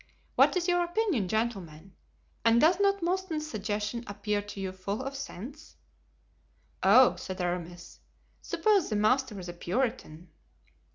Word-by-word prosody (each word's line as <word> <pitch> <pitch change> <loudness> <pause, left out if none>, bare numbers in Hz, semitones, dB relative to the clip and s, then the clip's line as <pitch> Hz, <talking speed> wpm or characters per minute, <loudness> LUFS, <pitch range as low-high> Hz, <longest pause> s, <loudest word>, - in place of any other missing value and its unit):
What - - +4
is 350 0 -1
your 355 0 +3
opinion, 345 - 0
gentlemen, 195 -5 -3 0.5
and 230 +1 +5
does 335 +6 +4
not 400 0 +4
M. - - +1
Mouston's 350 -4 -1
suggestion 210 0 -3
appear 205 +1 -2
to 205 -1 -9
you 190 -1 -3
full 200 +5 -4
of 270 +1 -4
sense?" 275 - -8 1.1
"Oh!" 245 +7 +6
said 185 0 -6
Aramis, 175 -1 -4 0.4
"suppose 415 -5 +2
the 215 - -1
master 215 +1 +1
is 180 - -8
a 175 - -6
Puritan?" 180 -4 -3
220 Hz, 145 wpm, -29 LUFS, 190-305 Hz, 1.1 s, Oh